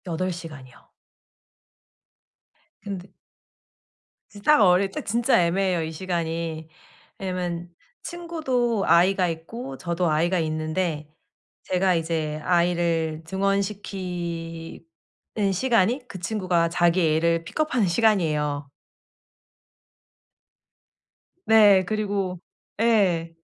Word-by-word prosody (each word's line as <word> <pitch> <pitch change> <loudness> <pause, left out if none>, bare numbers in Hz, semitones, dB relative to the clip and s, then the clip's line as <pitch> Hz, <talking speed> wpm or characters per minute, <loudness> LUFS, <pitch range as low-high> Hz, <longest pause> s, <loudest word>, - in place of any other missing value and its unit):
8 180 +2 -2
시간이요. 155 -7 -11 1.9
근데 195 -2 -7 1.2
이제 205 - -13
딱 300 +3 +5
어릴 190 0 +4
때 - - -4
진짜 235 -2 +2
애매해요 180 -1 +1
이 160 - -4
시간이. 165 -2 -3 0.5
왜냐하면 175 -2 -4 0.3
친구도 265 - -1
아이가 185 +2 +4
있고 165 - -6
저도 170 +1 -1
아이가 170 +4 +1
있는데 155 -1 -2 0.5
제가 185 0 +1
이제 160 -2 -2
아이를 170 -2 +1
등원시키는 180 -4 -3 0.7
시간이 240 +3 +1
그 190 - -9
친구가 180 -4 0
자기 170 -1 +2
애를 165 +1 +1
픽업하는 255 - 0
시간이에요. 155 -8 +1 2.7
네. 205 -4 +6
그리고 200 -3 -2 0.4
예. 190 -8 +2
180 Hz, 200 characters per minute, -24 LUFS, 165-200 Hz, 2.7 s, 네